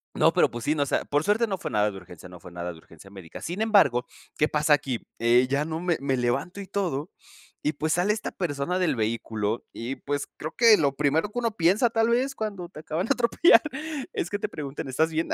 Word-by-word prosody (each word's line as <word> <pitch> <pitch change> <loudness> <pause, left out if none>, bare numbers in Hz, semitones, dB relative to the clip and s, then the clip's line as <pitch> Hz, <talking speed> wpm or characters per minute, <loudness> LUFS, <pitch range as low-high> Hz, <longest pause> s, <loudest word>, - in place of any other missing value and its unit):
No, - - +4
pero, - - +4
pues, 120 0 -7
sí, 150 - +2
¿no? 145 - +2
O - - -3
sea, - - -1
por 145 +1 0
suerte 210 +3 +2
no 195 -2 -2
fue - - -5
nada 105 0 +2
de 95 - -9
urgencia, 90 0 -12
no 90 -1 -12
fue 90 - -12
nada 85 0 -5
de 80 - -12
urgencia 85 +4 -16
médica. 95 -5 -10
Sin 180 +6 -4
embargo, 165 - +4 0.3
¿qué 150 - +3
pasa 150 0 +2
aquí? 135 -4 -1
Eh, 120 +2 +4
ya 140 +2 +1
no 160 0 -4
me 175 -2 0
me 135 -2 0
levanto 125 +11 -1
y 190 - -9
todo, 175 -5 -2 0.5
y, 150 - 0
pues, 155 +2 -1
sale 185 +4 +2
esta 215 - -5
persona 175 +1 -2
del 180 -7 +1
vehículo, 110 0 -2
y, 120 +4 -4
pues, 145 0 -3
creo 155 +1 -6
que 230 -3 +7
lo 140 -2 +1
primero 150 +7 +1
que 245 - -3
uno 230 -2 0
piensa 205 +5 +3
tal 225 0 +1
vez 260 +3 +1
cuando 200 -5 -5
te 155 - -11
acaban 160 +5 -2
de 275 - +4
atropellar 245 +7 +5 0.5
es 175 - -2
que 205 - -3
te - - -3
preguntan 140 -2 -6
¿estás 160 +5 +1
bien? 160 +1 -1
150 Hz, 245 wpm, -26 LUFS, 125-195 Hz, 0.5 s, que